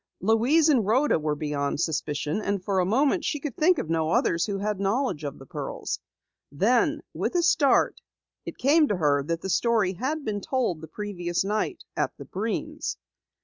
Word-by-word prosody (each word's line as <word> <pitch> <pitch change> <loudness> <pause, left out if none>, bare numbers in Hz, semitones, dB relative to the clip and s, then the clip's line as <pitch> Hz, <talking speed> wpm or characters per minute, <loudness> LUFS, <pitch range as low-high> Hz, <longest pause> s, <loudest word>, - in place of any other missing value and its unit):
Louise 235 - +3
and 270 -8 +4
Rhoda 240 - +2
were 150 -1 -1
beyond 145 -1 -2
suspicion, 155 +1 -1
and 200 -2 -2
for 195 -2 +1
a 180 - +2
moment 280 - +2
she 295 - -1
could 280 -3 -5
think 350 +3 +4
of 215 - -3
no 160 -1 0
others 180 - +2
who 200 -2 -2
had 205 0 -2
knowledge 200 - 0
of 140 -2 -5
the 135 - -12
pearls. - - -4 0.5
Then, 220 - +2
with - - -2
a 350 - +3
start, 325 -6 +3 0.4
it - - -8
came 300 +3 +4
to 205 - 0
her 145 -4 +2
that 165 +3 -3
the 190 - -3
story 220 -5 +2
had 280 - -3
been 205 -2 -2
told 235 - -1
the 160 - -8
previous 175 -1 -3
night 215 - -2
at - - -2
the - - -9
Breens. 230 +10 -3
205 Hz, 190 wpm, -26 LUFS, 165-265 Hz, 0.5 s, and